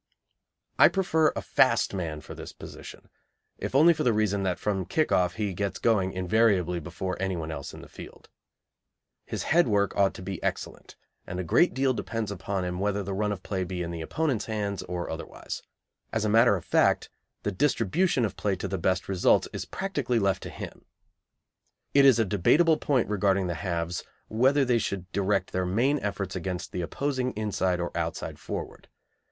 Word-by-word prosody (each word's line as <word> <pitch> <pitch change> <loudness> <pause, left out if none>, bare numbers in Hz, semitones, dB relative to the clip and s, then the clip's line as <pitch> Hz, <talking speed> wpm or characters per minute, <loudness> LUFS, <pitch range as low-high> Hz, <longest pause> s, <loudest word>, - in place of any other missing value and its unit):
I - - +10
prefer 160 -5 +2
a - - -3
fast 115 -5 +3
man 80 -5 -3
for - - -9
this - - -9
position, - - -11 0.5
if - - -4
only 160 +5 +7
for - - -4
the 120 - +3
reason 105 -2 +1
that 95 -2 0
from 100 -2 -1
the 95 - -3
kick 155 - 0
off 90 0 +2
he 105 -2 -2
gets 100 0 -2
going 100 -5 +2
invariably 95 -2 +2
before 95 +4 -5
anyone 85 -5 -2
else 70 -3 -6
in - - -11
the - - -11
field. - - -12 1.0
His - - -3
head 175 -1 +3
work 100 -2 +1
ought 100 -1 +2
to - - -8
be 95 -1 -5
excellent, - - -4 0.3
and 90 - -4
a - - -1
great 175 - +3
deal 135 0 +2
depends 115 -3 -3
upon 95 -1 -3
him 90 0 -3
whether 100 0 0
the 100 +1 -4
run 105 +2 0
of 95 -2 -5
play 95 -2 -2
be 90 0 -4
in 85 - -4
the 85 -1 -5
opponents' 130 - -1
hands 105 -3 -2
or 90 0 -4
otherwise. 80 +1 -6 0.5
As 110 -1 0
a - - +1
matter 115 0 +5
of 90 - -6
fact, - - +2 0.3
the 105 - 0
distribution 130 - +1
of 100 -2 -4
play 95 +3 0
to 95 - -4
the 95 -1 -3
best 95 +1 0
results 95 -2 +3
is - - -4
practically 145 -11 -2
left 100 -4 +1
to - - -6
him. - - -8 1.1
It 140 0 +6
is 130 -4 +7
a 115 - +3
debatable 150 - +4
point 135 -5 +1
regarding 100 -2 +1
the 90 - -1
halves 85 -1 -3 0.3
whether 135 +5 +3
they 120 -2 +3
should 95 -4 -4
direct 100 0 0
their 90 0 -1
main 125 +10 +2
efforts 100 -4 -3
against 90 0 -4
the 90 - -3
opposing 130 +7 -2
inside 95 -4 0
or 85 -1 -4
outside 85 -1 -3
forward. - - -6
100 Hz, 190 wpm, -27 LUFS, 90-115 Hz, 1.1 s, I